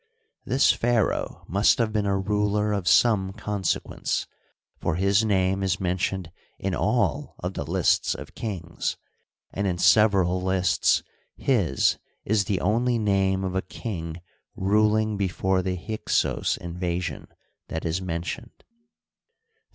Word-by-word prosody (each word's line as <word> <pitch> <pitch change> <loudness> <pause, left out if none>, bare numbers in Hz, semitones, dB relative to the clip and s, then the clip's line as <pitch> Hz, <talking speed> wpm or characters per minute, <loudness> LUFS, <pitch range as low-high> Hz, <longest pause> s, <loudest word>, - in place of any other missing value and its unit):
This 130 +2 +4
pharaoh 115 -3 0
must 100 +6 +3
have 115 -3 0
been 105 -2 0
a 100 0 +1
ruler 105 +1 0
of 100 -3 -2
some 95 +2 +4
consequence, 105 -3 -2 0.5
for - - -1
his 100 +4 +3
name 95 -2 +1
is 95 -2 0
mentioned 90 -1 -2 0.3
in 95 -1 -2
all 125 +8 0
of 90 +2 -4
the - - -3
lists 85 +2 +2
of - - -9
kings, 90 -6 -4 0.6
and 100 +1 -1
in 90 -2 -1
several 95 -2 +4
lists 95 -1 +2 0.3
his 95 - +2 0.3
is 105 -1 +2
the 95 -3 0
only 120 +5 +2
name 95 -3 +1
of 95 -1 -2
a 95 - 0
king 85 -4 -6 0.4
ruling 105 +2 +2
before 95 -1 0
the 90 0 -2
Hyksos 105 +5 -1
invasion 85 0 -4 0.4
that 80 - -4
is 85 +3 -1
mentioned. 90 +7 -5
95 Hz, 130 wpm, -25 LUFS, 90-105 Hz, 0.6 s, This